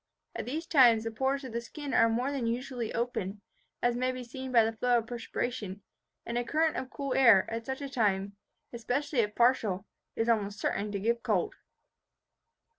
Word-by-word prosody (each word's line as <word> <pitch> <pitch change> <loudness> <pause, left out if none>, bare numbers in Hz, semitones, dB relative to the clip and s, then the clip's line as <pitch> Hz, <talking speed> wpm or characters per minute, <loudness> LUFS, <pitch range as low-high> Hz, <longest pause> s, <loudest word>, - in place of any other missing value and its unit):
At - - -4
these 315 +6 -3
times 240 -8 +5
the 225 - -3
pores 265 +4 -1
of 260 - -7
the 235 - -2
skin 285 +4 -7
are 230 - +5
more 245 +5 0
than 265 -5 -2
usually 240 -1 -3
open, 210 -4 -3 0.4
as 240 0 +3
may 255 +1 0
be 255 0 -6
seen 260 +2 -7
by 235 -3 +6
the 225 - -1
flow 245 +2 +2
of 230 - -1
perspiration; 230 -4 -4 0.4
and 235 +1 -1
a - - -1
current 315 +6 +1
of 255 - -4
cool 275 -1 -3
air, 230 -8 +6
at 230 0 -4
such 265 +1 -3
a - - -3
time, 200 -6 0 0.4
especially 250 +4 -1
if 210 -2 +1
partial, 225 -6 +2 0.3
is 225 - 0
almost 205 -3 +1
certain 205 +1 -1
to 200 - -2
give 235 +3 0
cold." 200 -7 0
235 Hz, 190 wpm, -30 LUFS, 220-260 Hz, 0.4 s, by